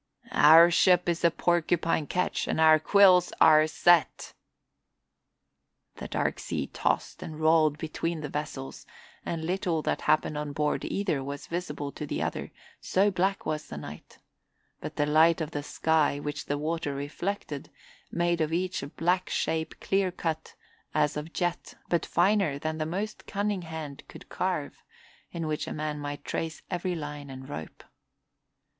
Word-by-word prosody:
"Our 165 Hz, +3 st, +8 dB
ship 180 Hz, 0 st, +4 dB
is 170 Hz, -1 st, +1 dB
the 170 Hz, -, +4 dB
Porcupine 170 Hz, -2 st, +1 dB
ketch 180 Hz, 0 st, -1 dB
and -, -, -1 dB
our 155 Hz, -1 st, +7 dB
quills 185 Hz, +1 st, +5 dB
are 155 Hz, 0 st, +7 dB
set." 170 Hz, +1 st, +2 dB, 1.6 s
The -, -, -6 dB
dark -, -, -1 dB
sea -, -, -3 dB
tossed -, -, -2 dB
and 155 Hz, -1 st, -7 dB
rolled 155 Hz, -1 st, +4 dB
between 160 Hz, +1 st, -3 dB
the 150 Hz, -, -4 dB
vessels 145 Hz, -2 st, -6 dB, 0.4 s
and 160 Hz, -1 st, -3 dB
little 175 Hz, -3 st, -1 dB
that -, -, -1 dB
happened 150 Hz, 0 st, +1 dB
on 150 Hz, -1 st, -4 dB
board 150 Hz, +1 st, 0 dB
either 180 Hz, -9 st, -1 dB
was 140 Hz, +1 st, -6 dB
visible 150 Hz, -5 st, -4 dB
to 150 Hz, -, -7 dB
the -, -, -3 dB
other, -, -, -3 dB, 0.3 s
so 200 Hz, +2 st, +2 dB
black 195 Hz, +2 st, 0 dB
was 155 Hz, -1 st, -3 dB
the 75 Hz, -, -7 dB
night; 75 Hz, +1 st, -10 dB, 0.6 s
but -, -, -7 dB
the 145 Hz, -, +1 dB
light 160 Hz, +3 st, +4 dB
of 160 Hz, -1 st, -3 dB
the 145 Hz, -, -3 dB
sky, 150 Hz, -1 st, +1 dB
which 145 Hz, 0 st, -5 dB
the 145 Hz, -, -1 dB
water 155 Hz, -1 st, -2 dB
reflected, 145 Hz, +1 st, -4 dB, 0.4 s
made 170 Hz, -1 st, +1 dB
of 155 Hz, 0 st, 0 dB
each 185 Hz, +2 st, -1 dB
a 140 Hz, -, -5 dB
black 180 Hz, +5 st, 0 dB
shape 160 Hz, 0 st, -2 dB
clear 195 Hz, -1 st, +1 dB
cut 160 Hz, -2 st, -4 dB, 0.4 s
as 150 Hz, -1 st, +2 dB
of 150 Hz, +2 st, -5 dB
jet 175 Hz, 0 st, -3 dB
but 170 Hz, -, 0 dB
finer 185 Hz, -5 st, +2 dB
than 155 Hz, +2 st, -3 dB
the 155 Hz, -, -1 dB
most 200 Hz, +6 st, -4 dB
cunning 205 Hz, -1 st, -1 dB
hand 160 Hz, -4 st, -7 dB
could -, -, -13 dB
carve, -, -, -3 dB, 0.5 s
in 165 Hz, -1 st, -4 dB
which 155 Hz, -1 st, -2 dB
a -, -, -5 dB
man 150 Hz, -1 st, -3 dB
might 145 Hz, 0 st, -6 dB
trace 160 Hz, -1 st, -4 dB
every 180 Hz, 0 st, -2 dB
line 145 Hz, -2 st, -6 dB
and 130 Hz, 0 st, -9 dB
rope. 80 Hz, -, -8 dB
160 Hz, 160 wpm, -28 LUFS, 150-175 Hz, 1.6 s, Our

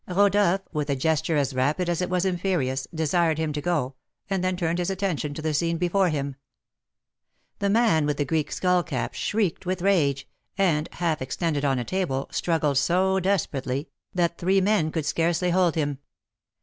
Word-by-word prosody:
Rodolph, 195 Hz, 0 st, +3 dB
with 150 Hz, -1 st, -2 dB
a 140 Hz, -, +2 dB
gesture 155 Hz, +3 st, +1 dB
as 140 Hz, -1 st, 0 dB
rapid 145 Hz, +8 st, 0 dB
as 175 Hz, 0 st, 0 dB
it 180 Hz, -, -1 dB
was 180 Hz, 0 st, +1 dB
imperious, 170 Hz, -8 st, -1 dB
desired 160 Hz, 0 st, +1 dB
him 160 Hz, -2 st, -1 dB
to 150 Hz, -, -3 dB
go, 145 Hz, -6 st, -1 dB, 0.4 s
and 190 Hz, -2 st, 0 dB
then 185 Hz, 0 st, 0 dB
turned 170 Hz, -1 st, -1 dB
his 175 Hz, +1 st, -1 dB
attention 180 Hz, -7 st, -2 dB
to 155 Hz, -, -6 dB
the 155 Hz, -1 st, 0 dB
scene 165 Hz, +2 st, 0 dB
before 180 Hz, +2 st, +2 dB
him. 140 Hz, -3 st, -3 dB, 1.2 s
The 200 Hz, -, +1 dB
man 205 Hz, -9 st, +3 dB
with 145 Hz, -1 st, -1 dB
the 145 Hz, -, 0 dB
Greek 150 Hz, +1 st, -1 dB
skull 180 Hz, -1 st, +2 dB
cap 160 Hz, -7 st, -3 dB
shrieked 200 Hz, -4 st, -1 dB
with 185 Hz, -1 st, -2 dB
rage, 145 Hz, -9 st, +2 dB, 0.3 s
and, 165 Hz, -6 st, +1 dB
half 165 Hz, -4 st, -1 dB
extended 145 Hz, +2 st, -2 dB
on 135 Hz, -2 st, +2 dB
a 120 Hz, -, -2 dB
table, 140 Hz, -4 st, -2 dB
struggled 155 Hz, -5 st, +1 dB
so 190 Hz, +5 st, +2 dB
desperately, 145 Hz, -8 st, -1 dB, 0.2 s
that 170 Hz, -2 st, 0 dB
three 190 Hz, +3 st, +3 dB
men 190 Hz, -5 st, +2 dB
could 160 Hz, -3 st, -2 dB
scarcely 170 Hz, +3 st, +1 dB
hold 180 Hz, -2 st, +2 dB
him. 145 Hz, -4 st, -1 dB
170 Hz, 180 wpm, -25 LUFS, 145-185 Hz, 1.2 s, Rodolph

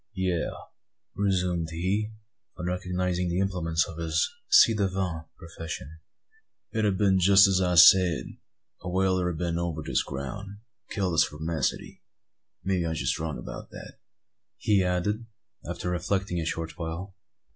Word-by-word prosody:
"Yes," 90 Hz, -3 st, -1 dB, 0.6 s
resumed 90 Hz, -4 st, 0 dB
he, 95 Hz, +6 st, -1 dB, 0.5 s
on 90 Hz, -, -5 dB
recognising 90 Hz, 0 st, -1 dB
the 85 Hz, -, -1 dB
implements 85 Hz, -4 st, 0 dB
of 80 Hz, -, -9 dB
his 80 Hz, -1 st, 0 dB, 0.2 s
ci 115 Hz, -, +7 dB
devant 95 Hz, -6 st, -2 dB
profession, 80 Hz, -2 st, -8 dB, 0.7 s
"it 110 Hz, -, -1 dB
ha' 95 Hz, -, -2 dB
been 95 Hz, -2 st, +3 dB
jest 100 Hz, +2 st, +7 dB
as 95 Hz, -1 st, +2 dB
I 90 Hz, -1 st, +1 dB
said. 85 Hz, 0 st, +7 dB, 0.6 s
A 90 Hz, -, -5 dB
whaler 95 Hz, -1 st, +1 dB
'a 85 Hz, -, -3 dB
been 85 Hz, 0 st, -2 dB
over 85 Hz, -3 st, -3 dB
this -, -, +1 dB
ground, 70 Hz, +8 st, -6 dB
and 100 Hz, +1 st, -10 dB, 0.3 s
killed 95 Hz, -4 st, -1 dB
the 80 Hz, -, +2 dB
spermacety. 80 Hz, +1 st, -1 dB, 0.6 s
Maybe 95 Hz, -2 st, 0 dB
I'm 80 Hz, -, -2 dB, 0.2 s
wrong 80 Hz, -4 st, -3 dB
about -, -, -8 dB
that," -, -, -11 dB, 0.6 s
he 100 Hz, -3 st, +2 dB
added, 105 Hz, +5 st, -1 dB, 0.4 s
after 90 Hz, 0 st, -3 dB
reflecting 90 Hz, +1 st, -1 dB
a 80 Hz, -, -2 dB
short 80 Hz, -1 st, -4 dB
while. 85 Hz, +4 st, -5 dB
90 Hz, 145 wpm, -27 LUFS, 80-95 Hz, 0.7 s, ci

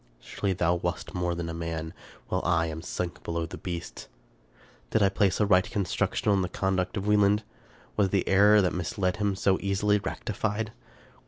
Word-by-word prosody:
Surely 100 Hz, +9 st, -3 dB
thou 85 Hz, -2 st, +2 dB
wast 85 Hz, 0 st, -3 dB
more 90 Hz, -1 st, -1 dB
than 85 Hz, -1 st, -4 dB
man, 80 Hz, -1 st, -4 dB, 0.3 s
while 95 Hz, -, -1 dB
I 85 Hz, -1 st, +2 dB
am 80 Hz, 0 st, -5 dB
sunk 90 Hz, 0 st, -4 dB
below 85 Hz, 0 st, -2 dB
the 80 Hz, -, -9 dB
beasts. 85 Hz, -3 st, -6 dB, 0.8 s
Did 110 Hz, -, +2 dB
I 100 Hz, -, +5 dB
place 95 Hz, 0 st, +1 dB
a 105 Hz, -, +4 dB
right 95 Hz, -2 st, +5 dB
construction 100 Hz, +1 st, 0 dB
on 100 Hz, -1 st, +3 dB
the 90 Hz, -, -2 dB
conduct 95 Hz, +1 st, -1 dB
of 100 Hz, -, -3 dB
Wie 105 Hz, 0 st, +4 dB
land? 105 Hz, +1 st, +3 dB, 0.5 s
Was 100 Hz, -2 st, +3 dB
the 95 Hz, -1 st, 0 dB
error 105 Hz, +2 st, +6 dB
that 90 Hz, -, +1 dB
misled 90 Hz, +2 st, -1 dB
him 100 Hz, -2 st, 0 dB
so 95 Hz, 0 st, +2 dB
easily 100 Hz, +1 st, +2 dB
rectified? 110 Hz, +1 st, -3 dB
95 Hz, 180 wpm, -28 LUFS, 85-100 Hz, 0.8 s, error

